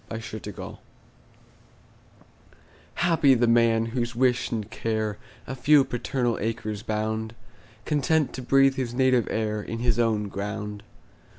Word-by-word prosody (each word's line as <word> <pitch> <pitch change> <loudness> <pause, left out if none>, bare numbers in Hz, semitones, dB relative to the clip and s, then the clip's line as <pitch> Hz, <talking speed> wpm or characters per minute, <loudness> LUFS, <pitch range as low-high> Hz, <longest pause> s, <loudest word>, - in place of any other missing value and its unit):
Y 110 - -4
Z 115 - -8 0.2
Solitude - - -8 2.2
HAPPY 165 -6 +4
the 120 0 +3
man, 115 -1 +3
whose 120 0 -3
wish 125 0 +2
and 110 -3 -3
care 110 -2 -2 0.3
A 130 - -5
few 140 +2 +5
paternal 120 -1 -2
acres 110 -1 -3
bound, 110 +1 -3 0.5
Content 150 0 +1
to 130 - -5
breathe 135 +2 +4
his 120 -2 -3
native 130 -2 +3
air 105 -1 -1
In 115 - -5
his 120 -1 0
own 110 -3 +1
ground. 105 +1 -5
115 Hz, 130 wpm, -26 LUFS, 110-130 Hz, 2.2 s, few